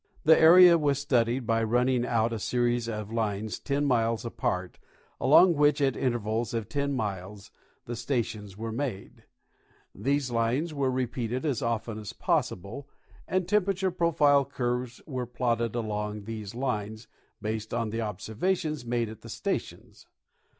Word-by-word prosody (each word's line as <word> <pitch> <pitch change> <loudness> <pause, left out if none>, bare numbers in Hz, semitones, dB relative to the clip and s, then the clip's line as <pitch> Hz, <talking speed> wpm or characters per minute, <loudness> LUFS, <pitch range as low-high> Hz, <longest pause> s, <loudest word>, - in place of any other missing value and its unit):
The 160 +1 +7
area 170 +1 +8
was 145 -2 +1
studied 125 -3 +1
by 115 0 +1
running 125 +2 +1
out 115 -1 +1
a 115 - -3
series 120 +1 0
of 105 -1 -5
lines 110 -2 -2
10 145 0 -1
miles 115 -3 +1
apart, 90 -5 -3 0.4
along 170 +6 +6
which 145 -1 +3
at 135 -3 +2
intervals 120 -2 -1
of 115 -3 -2
10 140 0 -1
miles 100 -3 -5 0.3
the 120 - -5
stations 110 -5 -3
were 115 +1 -4
made 115 -5 -5 0.7
These 140 -1 -1
lines 120 +8 0
were 140 -2 0
repeated 125 0 -2
as 140 -6 0
often 115 -1 -2
as 105 - -7
possible, 120 +10 -2 0.4
and 185 -2 0
temperature 195 -1 +1
profile 150 -5 +3
curves 125 -2 -3
were 130 -5 -4
plotted 120 -2 -1
along 105 -2 -3
these 110 -1 -7
lines, 110 -4 -3 0.3
based 110 0 -4
on 115 -2 -1
the 115 - -3
observa 110 - -1
tions 155 -6 -4
made 120 -1 -1
at 110 0 -10
the - - -11
stations. - - -5
120 Hz, 150 wpm, -28 LUFS, 110-140 Hz, 0.7 s, area